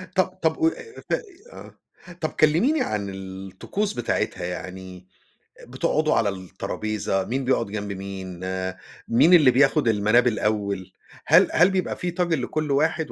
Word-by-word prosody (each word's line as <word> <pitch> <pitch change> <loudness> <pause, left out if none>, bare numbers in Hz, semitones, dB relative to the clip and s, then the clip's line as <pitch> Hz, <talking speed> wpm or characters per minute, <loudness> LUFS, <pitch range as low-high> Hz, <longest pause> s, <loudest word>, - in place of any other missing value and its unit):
طَب 185 - +4 0.2
طَب 160 0 +2
قو 325 - +2
آآ 450 +6 -5
ف - - 0
آآ - - 0 0.8
آه، 175 - -10
طَب 155 - 0
كلِّميني 195 - +2
عن 105 - -2
الطقوس 95 - -5
بتاعتها، 115 -6 -2
يعني 90 0 -7 0.5
آآ - - -13
بتقعدوا 155 0 0
على 105 - +2
الترابيزة، 95 +1 -3
مين 130 +4 -2
بيقعد 125 -2 +1
جنب 100 0 -5
مين، 95 -2 -7
آآ 95 0 -3 0.3
مين 155 +10 +5
اللي 150 -7 +7
بياخُد 135 +1 +3
المَناب 110 +3 +3
الأول؟ 100 -4 -1 0.3
هل - - +6
هل 180 +4 +5
بيبقى 190 -1 -1
فيه 175 -1 -4
طاجن 170 -5 0
لكل 150 +3 -2
واحد 155 +2 +1
115 Hz, 155 wpm, -24 LUFS, 95-155 Hz, 0.8 s, اللي